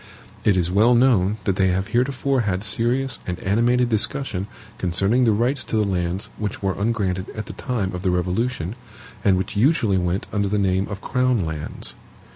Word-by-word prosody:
It 100 Hz, -3 st, +3 dB
is 90 Hz, -1 st, 0 dB
well 110 Hz, +6 st, +5 dB
known 110 Hz, -5 st, +3 dB
that 95 Hz, -1 st, 0 dB
they 95 Hz, -, +3 dB
have 95 Hz, +2 st, 0 dB
heretofore 130 Hz, +2 st, +1 dB
had 100 Hz, -3 st, -1 dB
serious 120 Hz, +4 st, 0 dB
and 90 Hz, -1 st, -2 dB
animated 120 Hz, +5 st, +2 dB
discussion 110 Hz, -3 st, 0 dB, 0.3 s
concerning 95 Hz, +8 st, +2 dB
the 115 Hz, -, +4 dB
rights 120 Hz, +6 st, +1 dB
to -, -, -3 dB
the 110 Hz, -, +3 dB
lands 90 Hz, 0 st, -2 dB
which 105 Hz, -2 st, -4 dB
were 95 Hz, -1 st, +1 dB
ungranted 100 Hz, -3 st, -1 dB
at 110 Hz, -1 st, -4 dB
the -, -, -8 dB
time 110 Hz, -8 st, -2 dB
of 90 Hz, -, -4 dB
the 95 Hz, -, 0 dB
Revolution, 90 Hz, +2 st, -1 dB, 0.5 s
and 95 Hz, -2 st, +4 dB
which 95 Hz, +2 st, -3 dB
usually 110 Hz, -, +3 dB
went 90 Hz, +2 st, -1 dB
under 100 Hz, -1 st, +1 dB
the 105 Hz, +2 st, 0 dB
name 95 Hz, -1 st, +1 dB
of 100 Hz, -1 st, -6 dB
crown 125 Hz, -6 st, +1 dB
lands. 80 Hz, -2 st, -6 dB
100 Hz, 185 wpm, -22 LUFS, 95-120 Hz, 0.5 s, well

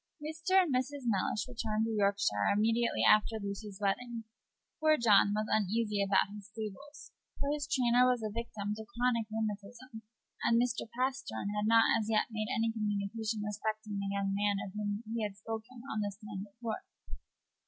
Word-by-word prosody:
Mr. 320 Hz, +5 st, 0 dB
and 350 Hz, -7 st, +2 dB
Mrs. 260 Hz, +1 st, -1 dB
Mellish 210 Hz, 0 st, 0 dB
returned 220 Hz, -3 st, -1 dB
to 225 Hz, -, -2 dB
Yorkshire 200 Hz, -, +2 dB
immediately 230 Hz, +2 st, +2 dB
after 215 Hz, +1 st, +5 dB
Lucy's 200 Hz, 0 st, -5 dB
wedding. 230 Hz, +3 st, -1 dB, 0.6 s
Poor 310 Hz, 0 st, +4 dB
John 205 Hz, -3 st, +5 dB
was 215 Hz, 0 st, 0 dB
uneasy 210 Hz, 0 st, +1 dB
about 195 Hz, 0 st, +2 dB
his 205 Hz, -1 st, -9 dB
stables: 225 Hz, +8 st, -8 dB, 0.3 s
for 280 Hz, -, 0 dB
his 290 Hz, -1 st, -3 dB
trainer 250 Hz, -2 st, +4 dB
was 245 Hz, -3 st, +1 dB
a 215 Hz, -1 st, -3 dB
victim 215 Hz, -3 st, -3 dB
to 220 Hz, +1 st, -7 dB
chronic 240 Hz, -2 st, +2 dB
rheumatism, 220 Hz, +2 st, -5 dB, 0.4 s
and 230 Hz, 0 st, +4 dB
Mr. 240 Hz, -2 st, 0 dB
Pastern 260 Hz, -5 st, -1 dB
had 210 Hz, 0 st, 0 dB
not 225 Hz, 0 st, +6 dB
as 215 Hz, 0 st, -3 dB
yet 220 Hz, +1 st, +2 dB
made 215 Hz, -1 st, -2 dB
any 230 Hz, -3 st, +1 dB
communication 215 Hz, 0 st, -2 dB
respecting 215 Hz, 0 st, -3 dB
the 200 Hz, 0 st, -2 dB
young 200 Hz, 0 st, -1 dB
man 205 Hz, 0 st, +1 dB
of 190 Hz, -, -9 dB
whom 210 Hz, +1 st, -3 dB
he 230 Hz, -, -1 dB
had 205 Hz, -2 st, -3 dB
spoken 225 Hz, +3 st, -7 dB
on 215 Hz, -, -1 dB
the 205 Hz, -, 0 dB
stand 205 Hz, 0 st, -7 dB
at 200 Hz, -, -27 dB
York. 230 Hz, +10 st, -2 dB
220 Hz, 175 wpm, -32 LUFS, 205-240 Hz, 0.6 s, not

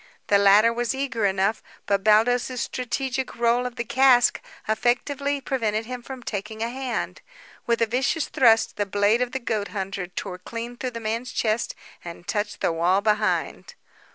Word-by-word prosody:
The 200 Hz, -, +5 dB
latter 205 Hz, +3 st, +6 dB
was 240 Hz, +2 st, -1 dB
eager 235 Hz, -6 st, 0 dB
enough, 195 Hz, +3 st, 0 dB, 0.2 s
but 200 Hz, -1 st, 0 dB
Baldos's 245 Hz, +4 st, +3 dB
strategic 260 Hz, +1 st, -3 dB
roll 235 Hz, +1 st, +2 dB
of 245 Hz, -, -9 dB
the 235 Hz, -, -2 dB
cask 245 Hz, 0 st, +4 dB, 0.3 s
effectively 280 Hz, +6 st, 0 dB
prevented 225 Hz, -5 st, -1 dB
him 250 Hz, +1 st, -6 dB
from 260 Hz, 0 st, -9 dB
taking 220 Hz, +1 st, -4 dB
a 230 Hz, -, -1 dB
hand. 260 Hz, -1 st, -4 dB, 0.5 s
With 235 Hz, -1 st, +2 dB
a -, -, +4 dB
vicious 265 Hz, +7 st, 0 dB
thrust, 230 Hz, -3 st, +3 dB
the 205 Hz, -1 st, -1 dB
blade 205 Hz, +4 st, +2 dB
of 250 Hz, -1 st, -1 dB
the 265 Hz, -, -2 dB
goat 220 Hz, -5 st, -2 dB
hunter 195 Hz, -2 st, -4 dB
tore 180 Hz, 0 st, -6 dB
clean 230 Hz, +5 st, -6 dB
through 255 Hz, +1 st, -3 dB
the -, -, -4 dB
man's 230 Hz, +3 st, -3 dB
chest 220 Hz, 0 st, -1 dB, 0.3 s
and 170 Hz, 0 st, -9 dB
touched 210 Hz, -1 st, -2 dB
the -, -, +2 dB
wall 175 Hz, +4 st, +2 dB
behind. 215 Hz, -, -1 dB
230 Hz, 170 wpm, -24 LUFS, 205-250 Hz, 0.5 s, latter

